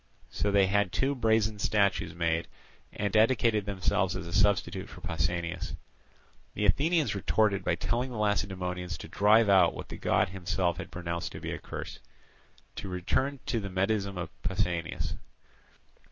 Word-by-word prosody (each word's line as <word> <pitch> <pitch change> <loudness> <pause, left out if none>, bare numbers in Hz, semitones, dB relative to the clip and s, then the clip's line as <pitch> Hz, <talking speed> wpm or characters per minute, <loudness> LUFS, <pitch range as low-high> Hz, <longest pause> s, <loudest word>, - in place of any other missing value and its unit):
So 105 - 0
they 100 -1 +4
had 100 -1 +1
two 135 +2 +1
brazen 110 -4 +1
statues 100 -3 +1
made, 85 -1 0 0.4
and 100 -1 -2
dedicated 110 -2 +3
them 100 -1 -3
as 90 - +1
a 90 -2 -1
substitute 100 -1 +1
for - - -11
Pausanias. 85 0 -2 0.8
The 105 - 0
Athenians 150 - +2
retorted 100 0 +1
by - - +1
telling 120 +2 -1
the 120 - -6
Lacedaemonians 90 -5 -1
to - - -9
drive 105 +2 +4
out 95 -4 +5
what - - -8
the - - -7
god - - +2
himself 90 -2 -1
had 95 - -6
pronounced 85 -1 -4
to - - -7
be - - -5
a - - -4
curse. - - -7 0.8
To 95 - -5
return 120 +10 -1
to 115 - 0
the 100 -2 -5
Medism 100 +1 0
of 90 -1 -4
Pausanias. 85 -3 -1
100 Hz, 155 wpm, -29 LUFS, 90-105 Hz, 0.8 s, out